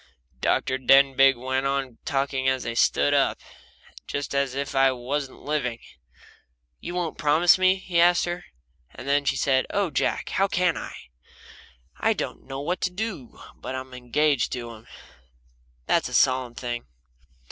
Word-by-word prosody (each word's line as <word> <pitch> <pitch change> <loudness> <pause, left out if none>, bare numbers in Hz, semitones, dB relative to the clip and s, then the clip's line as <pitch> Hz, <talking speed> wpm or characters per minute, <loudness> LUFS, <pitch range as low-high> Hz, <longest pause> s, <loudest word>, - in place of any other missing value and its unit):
Dr. 130 - 0
Denbigh 135 +1 +5
went 130 +2 -1
on 135 -3 -3
talking 135 -2 -1
as 130 -1 -1
they 115 - -3
stood 70 -10 +2
up, - - +2 0.7
just 140 0 -4
as 140 -2 0
if 140 0 -3
I 135 0 +4
wasn't 130 +2 -4
living. 135 -6 -2 1.0
"You 175 - -6
won't 175 -3 -3
promise 160 +4 +4
me?" 185 0 +4
he 180 -3 0
asked 175 +1 +4
her. 175 +1 -5 0.5
And 140 +1 0
she - - -1
said: 135 -1 +1
"Oh, 200 -4 0
Jack, - - -1
how 195 - +1
can 180 -2 +1
I? - - -7 1.0
I - - +2
don't - - -6
know 135 0 -5
what 175 +5 -2
to - - +1
do 185 - -6 0.2
but 130 - -6
I'm 130 0 -7
engaged 125 +2 0
to 120 -2 -5
him 110 0 -14 1.0
that's - - +1
a - - -4
solemn 130 -2 +2
thing." 120 - -5
135 Hz, 155 wpm, -25 LUFS, 130-160 Hz, 1.0 s, Denbigh